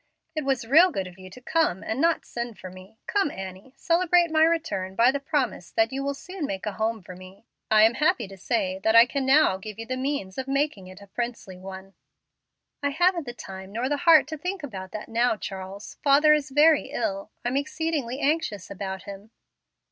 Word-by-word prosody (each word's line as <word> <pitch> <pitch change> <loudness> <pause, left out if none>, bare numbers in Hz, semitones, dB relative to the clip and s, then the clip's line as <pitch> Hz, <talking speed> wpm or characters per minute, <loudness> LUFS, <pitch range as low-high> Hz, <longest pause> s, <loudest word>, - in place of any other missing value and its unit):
It 310 - -1
was 265 -4 0
real 320 +10 +6
good 195 - -3
of 185 0 -12
you 185 0 -11
to 220 - -12
come, 305 - 0
and 240 +5 -2
not 335 0 +2
send 235 -3 -5
for 185 -1 -9
me. 185 +4 -14
Come 400 -7 +1
Annie, 190 +4 -9
celebrate 345 0 +3
my 315 0 +4
return 320 - 0
by 235 +5 +5
the 280 - -2
promise 275 - -2
that 335 -3 +2
you 270 +1 -3
will 280 0 -2
soon 360 0 -6
make 190 -1 -5
a 210 - -1
home 220 0 -2
for 185 - -10
me. 185 +4 -14 0.2
I 215 0 +6
am 225 +2 +5
happy 260 -5 +1
to 195 - -11
say 190 -1 -1
that 220 +3 +2
I 230 +1 +9
can 265 +1 -3
now 275 -8 +5
give 210 +1 -9
you 225 - -6
the 255 - -3
means 265 -7 -3
of 260 - -4
making 275 -8 -1
it 185 +2 -12
a - - -15
princely 235 -3 -5
one." 190 +1 -10 0.9
"I 285 - +1
haven't 350 0 +1
the 240 - -5
time 190 -3 -9
nor 235 +4 -2
the 290 +1 0
heart 330 0 +6
to 315 - -5
think 360 +2 -4
about 190 -9 -7
that 215 - -6
now, 235 0 +1
Charles. 195 +1 -8
Father 295 +2 +6
is 300 -3 0
very 295 +3 +5
ill. 200 -3 -3 0.2
I'm 245 +2 0
exceedingly 285 -3 -2
anxious 280 - -1
about 190 -1 -5
him." 200 +1 -10
240 Hz, 215 wpm, -25 LUFS, 195-295 Hz, 0.9 s, I